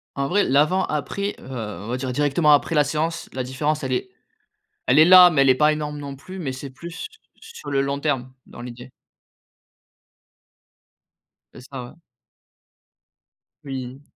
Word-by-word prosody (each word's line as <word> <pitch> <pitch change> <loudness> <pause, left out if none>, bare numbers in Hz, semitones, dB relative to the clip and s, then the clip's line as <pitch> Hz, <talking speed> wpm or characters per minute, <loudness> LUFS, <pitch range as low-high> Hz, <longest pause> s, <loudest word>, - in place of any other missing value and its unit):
En 140 0 -1
vrai, 200 +7 +2
l'avant-après, 155 +6 0
heu, - - -14
on 105 -6 -6
va 125 - -2
dire 130 0 -3
directement 145 +3 +2
après 155 +3 +2
la 150 - +5
séance, 155 +4 -3
la 130 -1 -3
différence 145 +4 -2
elle 130 -1 -2
est - - -2 0.8
elle 130 +4 +4
est 155 - +8
là, 180 -1 +9
mais 155 -5 +2
elle 135 - +4
est 130 - +6
pas 150 +3 +3
énorme, 150 -1 -4
non 140 -1 -7
plus, 185 +8 -10
mais 145 -7 -3
c'est 130 +2 -7
plus 170 - -8 0.3
sur 450 - -10
le 140 - +1
long 140 +1 -1
terme, 135 -4 -2
dans - - -13
l'idée. 125 +1 -9 2.6
C'est - - -12
ça, 135 -2 -6
ouais. - - -12 1.7
Oui. 135 -1 -7
140 Hz, 160 wpm, -22 LUFS, 130-155 Hz, 2.6 s, là